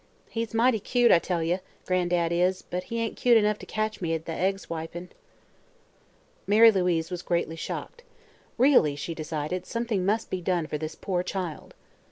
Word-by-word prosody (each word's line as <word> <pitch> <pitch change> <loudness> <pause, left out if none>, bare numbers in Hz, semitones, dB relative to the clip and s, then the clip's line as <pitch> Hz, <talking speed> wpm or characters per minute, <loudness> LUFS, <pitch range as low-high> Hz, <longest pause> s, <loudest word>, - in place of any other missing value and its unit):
He's 230 -1 -3
mighty 230 0 +3
cute, 240 +3 +3
I 170 - +7
tell 170 -1 -2
ye, 175 +3 0 0.3
Gran'dad 175 -2 +1
is; 180 +2 +1
but 180 +1 -5
he 230 - -3
ain't 230 -1 -2
cute 240 -2 +5
enough 210 -1 +2
to - - -10
catch 215 -1 -2
me 165 -2 0
at 160 0 -6
the - - -5
egg 190 +4 0
swipin'." 170 0 -7 1.4
Mary 220 +3 +7
Louise 180 -4 0
was 180 -1 -4
greatly 170 -2 -1
shocked. 475 - -6 0.6
Really, 245 - +5
she 155 +4 -5
decided, 160 +2 -4
something 230 -5 -1
must 215 +4 0
be 185 - -2
done 175 -2 0
for 150 -1 -4
this 155 0 -5
poor 180 -2 -2
child. 180 -4 -5
180 Hz, 180 wpm, -27 LUFS, 165-215 Hz, 1.4 s, I